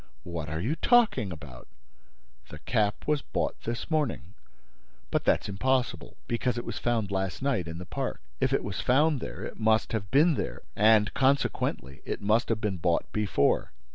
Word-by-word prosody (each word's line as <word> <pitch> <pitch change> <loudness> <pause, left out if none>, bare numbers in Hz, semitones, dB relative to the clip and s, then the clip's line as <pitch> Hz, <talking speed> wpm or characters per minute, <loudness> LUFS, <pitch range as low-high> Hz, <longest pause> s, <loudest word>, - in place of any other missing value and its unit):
What 85 -4 -5
are 80 +1 -3
you 120 - -1
talking 225 - +3
about?" 70 -7 -10 0.8
"The - - -9
cap 105 -1 0
was 150 -2 +1
bought - - -2
this 115 +7 -4
morning." 140 - -1 0.8
"But - - 0
that's - - +2
impossible, 130 +6 -1
because 120 +1 -1
it 120 - -4
was - - -4
found 115 -4 0
last 95 +5 -2
night 120 - 0
in 80 0 -6
the 90 - -7
park. 135 +5 -3 0.2
If 130 0 +1
it 135 - +1
was 100 - -3
found 145 +3 +3
there, - - -6
it - - -7
must 110 0 +2
have 100 -4 -3
been 155 - +5
there; - - -4
and, 105 0 +4
consequently, 135 - 0
it - - -4
must 110 +4 +2
have 115 -2 +1
been 105 -3 -1
bought 85 0 0
before." 105 -9 +1
110 Hz, 175 wpm, -28 LUFS, 95-130 Hz, 0.8 s, been